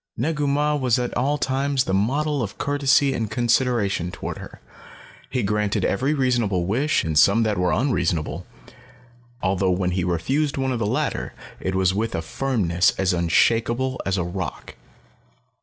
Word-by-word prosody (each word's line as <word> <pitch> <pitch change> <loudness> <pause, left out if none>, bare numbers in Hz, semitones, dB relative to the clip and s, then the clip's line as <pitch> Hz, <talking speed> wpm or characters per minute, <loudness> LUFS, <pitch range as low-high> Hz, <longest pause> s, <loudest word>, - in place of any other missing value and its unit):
Negu 150 -2 -1
Mah 150 +2 +1
was 125 -4 +2
at 125 -1 -3
all 140 +4 +1
times 135 -1 0
the 95 - -3
model 140 +8 0
of 100 -4 -5
courtesy 140 -1 +2
and 110 -2 -2
consideration 115 -5 +1
toward - - -6
her. - - -11 0.7
He 125 - -1
granted 105 -1 0
every 135 +9 0
reasonable 120 -9 +1
wish 130 - +1
and 80 -1 -2
some 110 +4 +5
that 105 -4 0
were 90 -1 +1
unreasonable 115 - -1 1.0
although 95 0 +1
when 90 0 0
he 90 0 -1
refused 130 - 0
one 135 -1 0
of 125 - -2
the 110 - 0
latter, - - -2 0.2
it 95 0 -3
was 95 -1 +2
with 115 +3 -2
a 80 - -2
firmness 90 -5 +1
as 95 -1 +1
unshakeable 115 +9 +1
as 100 0 -1
a 90 - 0
rock. 90 +1 -5
115 Hz, 160 wpm, -23 LUFS, 95-135 Hz, 1.0 s, some